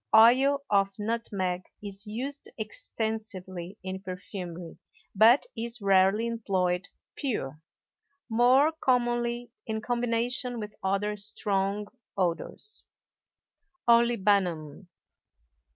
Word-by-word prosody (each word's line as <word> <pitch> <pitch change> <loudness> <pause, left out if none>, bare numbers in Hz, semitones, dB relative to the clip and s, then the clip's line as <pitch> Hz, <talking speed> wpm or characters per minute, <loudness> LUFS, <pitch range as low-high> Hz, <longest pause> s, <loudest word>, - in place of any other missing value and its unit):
Oil 265 +5 +6
of 195 -1 +2
nutmeg 205 -5 -1 0.2
is 200 +1 -6
used 265 +7 -4
extensively 210 -4 -4
in 190 0 -4
perfumery, 180 -2 -7 0.3
but 225 +6 +6
is 235 +1 -3
rarely 195 +2 +4
employed 190 -6 0 0.3
pure, 155 - -3 0.7
more 250 +6 +5
commonly 240 -4 0 0.2
in 220 -1 -1
combination 240 +1 -1
with 210 -1 -6
other 200 +2 0
strong 200 -1 -1 0.3
odors. 185 - -1 1.0
OLIBANUM. 200 -9 +2
215 Hz, 85 wpm, -28 LUFS, 190-235 Hz, 1.0 s, Oil